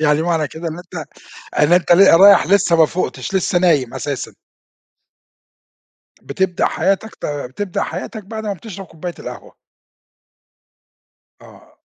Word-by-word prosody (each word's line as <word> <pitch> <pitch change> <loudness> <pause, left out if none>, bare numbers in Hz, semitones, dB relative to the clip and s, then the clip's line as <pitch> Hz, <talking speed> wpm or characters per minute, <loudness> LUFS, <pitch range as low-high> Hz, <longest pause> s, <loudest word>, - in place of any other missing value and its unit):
يعني 150 0 +2
معنى 165 -3 0
كده 165 +1 -6
إن 160 +2 -7
أنت 175 -3 -8 0.6
إن 150 +3 +3
أنت 175 -1 +4
ل 185 -1 +6
رايح 200 0 +7
لسه 185 -3 +3
مافوقتش، 170 +4 0
لسه 185 -1 +1
نايم 150 -9 +1
أساسًا. 135 0 -4 1.9
بتبدأ 180 +5 -1
حياتك، 195 +3 -1
ت - - -6
بتبدأ 145 +7 -4
حياتك 200 +5 -6
بعد 220 +1 -7
ما 205 - -1
بتشرب 195 0 -9
كوباية 170 +1 -8
القهوة. - - -9 1.9
آه. - - -18
175 Hz, 125 wpm, -18 LUFS, 155-195 Hz, 1.9 s, رايح